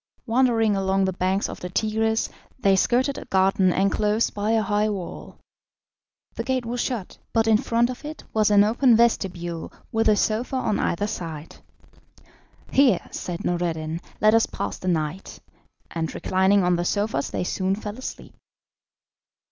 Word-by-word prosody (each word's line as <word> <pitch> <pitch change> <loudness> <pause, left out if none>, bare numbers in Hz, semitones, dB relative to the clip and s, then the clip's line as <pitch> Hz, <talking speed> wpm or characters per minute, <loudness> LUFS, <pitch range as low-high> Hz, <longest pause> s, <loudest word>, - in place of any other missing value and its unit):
Wandering 230 -3 +2
along 195 0 +1
the 190 - -1
banks 190 +2 0
of - - -8
the 180 - -6
Tigris, 220 +3 0 0.3
they 195 -6 +3
skirted 255 +7 +1
a - - -10
garden 190 0 +3
enclosed 210 +4 +1
by 205 +1 -2
a 225 -1 +2
high 210 +1 +1
wall. 195 -4 -6 1.0
The - - -4
gate 260 -2 -1
was 240 +1 -2
shut, 230 -8 -4
but 225 -1 +3
in 220 -1 +5
front 235 +1 +1
of 250 - -10
it 305 +1 -7
was 215 -1 +3
an 205 -1 +6
open 235 +3 +4
vestibule 175 -7 0 0.2
with 225 0 +2
a 210 - +5
sofa 225 +5 0
on 220 -5 0
either 200 +4 0
side. 165 -6 -6 1.1
"Here," 260 -9 +4
said 175 -1 -5
Noureddin, 165 -2 -2 0.2
"let 215 +1 +5
us 225 0 +4
pass - - -5
the 185 - -6
night," 160 +1 -2 0.5
and 165 -1 -3
reclining 190 +1 +2
on 180 -1 +2
the 175 - -1
sofas 200 -6 -1
they - - -2
soon 190 +1 -1
fell 210 +2 -7
asleep. 260 - -8
205 Hz, 160 wpm, -24 LUFS, 185-225 Hz, 1.1 s, an